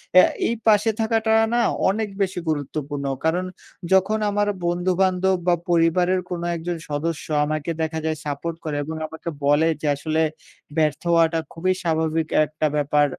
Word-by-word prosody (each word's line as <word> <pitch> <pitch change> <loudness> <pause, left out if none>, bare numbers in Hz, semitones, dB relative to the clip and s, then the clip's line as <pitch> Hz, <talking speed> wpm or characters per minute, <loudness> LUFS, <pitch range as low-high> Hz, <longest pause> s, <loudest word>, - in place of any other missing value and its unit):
অ্যা 185 - +9 0.2
এই 235 - +1
পাশে 210 +1 +5
থাকাটা 220 0 +1 0.2
না 240 - +3 0.3
অনেক 210 +2 -1
বেশি 190 -2 0
গুরুত্বপূর্ণ। 145 -1 -3 0.2
কারণ 175 +3 +1 0.5
যখন 195 +3 +3
আমার 205 0 +1 0.2
বন্ধুবান্ধব 185 +2 +2
বা 175 - +5
পরিবারের 175 +2 +3
কোনো 175 -1 -3
একজন 170 +1 -3
সদস্য 150 +2 -2 0.2
আমাকে 155 +2 -2
দেখা 160 0 -1
যায় 155 -1 -1
সাপোর্ট 150 +3 -3
করে 155 -2 -3
এবং 160 +2 -5
আমাকে 160 +2 -7 0.2
বলে 145 +3 +4
যে, 150 - -2
"আসলে 155 +2 -1 0.6
ব্যর্থ 155 -2 +1
হওয়াটা 165 0 +3
খুবই 185 +3 +1
স্বাভাবিক 160 -1 0 0.2
একটা 155 +1 -1
ব্যাপার 145 0 +3
165 Hz, 150 wpm, -23 LUFS, 155-185 Hz, 0.6 s, অ্যা